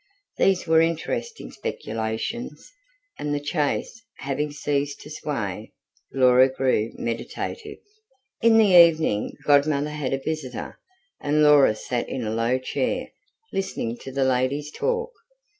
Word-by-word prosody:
These 190 -2 +3
were 160 -1 +4
interesting 165 - -2
speculations, 110 - -5 0.5
and, 145 0 -2
the 145 - -4
chaise 150 +8 -1 0.2
having 140 +2 -2
ceased 145 -1 -2
to 150 - -11
sway, 110 -10 -4 0.4
Laura 130 0 +5
grew 130 -4 0
meditative. 420 - -5 0.6
In 230 0 +5
the 210 -4 +5
evening 160 -11 +5
Godmother 145 0 +3
had 150 -3 -3
a - - +1
visitor, 150 -6 -5 0.4
and 150 +1 +2
Laura 145 -7 +6
sat 120 +2 -3
in 130 - -3
a 110 - -2
low 115 +3 +1
chair, 130 - -2 0.4
listening 120 -11 -2
to 135 - -8
the 135 0 0
ladies' 130 +3 0
talk. 475 - -2
145 Hz, 125 wpm, -24 LUFS, 130-160 Hz, 0.6 s, Laura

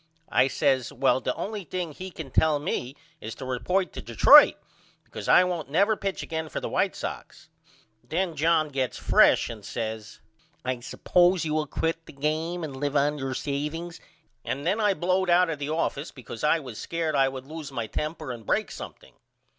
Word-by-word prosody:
I 130 - +4
says 130 -2 +1
Well 130 +1 +2
the - - -2
only 210 -1 -4
thing 175 0 -4
he 185 +5 -8
can 160 -6 -9
tell 155 +2 +3
me 140 -2 -3 0.2
is 110 - -7
to 135 - -8
report 180 +9 -1
to - - -6
Detroit - - +7 0.5
because - - -8
I 180 - +7
won't 175 -5 -3
never 200 +8 +3
pitch 195 -2 -3
again 160 -1 -4
for - - -4
the - - -4
White - - 0
Sox. - - -7 0.5
Then 165 +6 -2
John 155 0 +2
gets 135 -3 -2
fresh - - +4
and 110 -3 -8
says 110 -1 -5 0.5
I 130 -1 -1
suppose 175 +8 +2
you 155 - -1
will 155 -1 0
quit 165 +3 -2
the - - -11
game 160 +5 -2
and 145 -4 -5
live 145 +1 -2
on 145 +1 +2
your 135 -1 -3
saveings 150 +5 -4 0.4
and 140 +3 -4
then 195 +6 +1
I 205 -2 +3
blowed 185 +1 0
out 175 0 +4
of 155 - -5
the 145 0 -3
office 155 -1 -1
because 120 -2 -10
I 150 +2 +4
was 125 -7 -9
scared 165 -2 -2
I 135 -1 +4
would 130 -1 -8
loose 155 -1 -8
my 120 -4 -3
temper 155 +4 -4
and 120 -2 -8
break - - 0
something. - - -10
155 Hz, 195 wpm, -26 LUFS, 135-170 Hz, 0.5 s, Detroit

